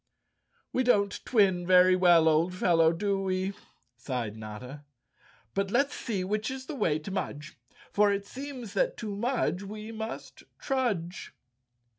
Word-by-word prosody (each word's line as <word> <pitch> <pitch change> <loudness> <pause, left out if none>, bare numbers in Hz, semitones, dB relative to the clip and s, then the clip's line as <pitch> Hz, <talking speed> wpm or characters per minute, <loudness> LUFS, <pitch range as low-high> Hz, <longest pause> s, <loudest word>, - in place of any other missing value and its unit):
"We 255 - +2
don't 205 -5 +2
twin 190 -6 +2
very 185 0 +6
well, 175 -3 +5
old 165 +3 +2
fellow, 165 -3 +4
do 195 +3 -1
we?" 190 0 -1 0.4
sighed 120 -3 -4
Notta. 110 +7 -8 0.7
"But 195 0 -1
let's 275 +7 +2
see 205 -6 -3
which 210 +5 -1
is 260 0 -6
the 310 - -6
way 160 - +1
to 155 +5 -7
Mudge, 155 -5 -4 0.4
for 205 0 +4
it 200 0 -2
seems 260 -1 -7
that - - +1
to 210 -3 -5
Mudge 235 -4 0
we 215 +2 -7
must 220 0 -7 0.2
trudge." 200 - -2
195 Hz, 145 wpm, -29 LUFS, 170-220 Hz, 0.7 s, very